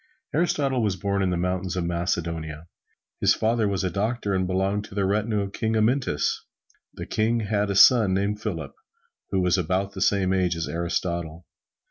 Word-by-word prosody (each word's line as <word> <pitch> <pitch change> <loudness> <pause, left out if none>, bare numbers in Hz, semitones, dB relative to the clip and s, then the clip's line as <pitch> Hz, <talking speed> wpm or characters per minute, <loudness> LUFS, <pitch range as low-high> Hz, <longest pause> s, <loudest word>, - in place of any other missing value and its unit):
Aristotle 140 -5 +1
was 105 -3 0
born 100 +1 -1
in 95 - +1
the 90 - 0
mountains 90 +1 -2
of 90 - -1
Macedonia. 85 -3 -3 0.5
His - - +4
father 110 -1 +1
was 95 -3 -1
a 90 - -1
doctor 105 +2 -1
and 95 -1 0
belonged 95 +2 0
to 100 - -12
the 100 -1 +1
retinue 105 +2 0
of 100 0 -5
King 110 0 -1
Amyntas. 110 - +1 0.6
The - - -6
King 115 +2 0
had 105 -1 0
a 100 - -1
son 105 -2 +6
named 100 +2 -1
Philip, 85 -10 -4 0.6
who 95 - +1
was 90 +1 +2
about 95 +3 -1
the 95 - -6
same 95 -1 +2
age 90 -2 +1
as 80 0 -3
Aristotle. 85 -1 -3
95 Hz, 180 wpm, -25 LUFS, 90-105 Hz, 0.6 s, son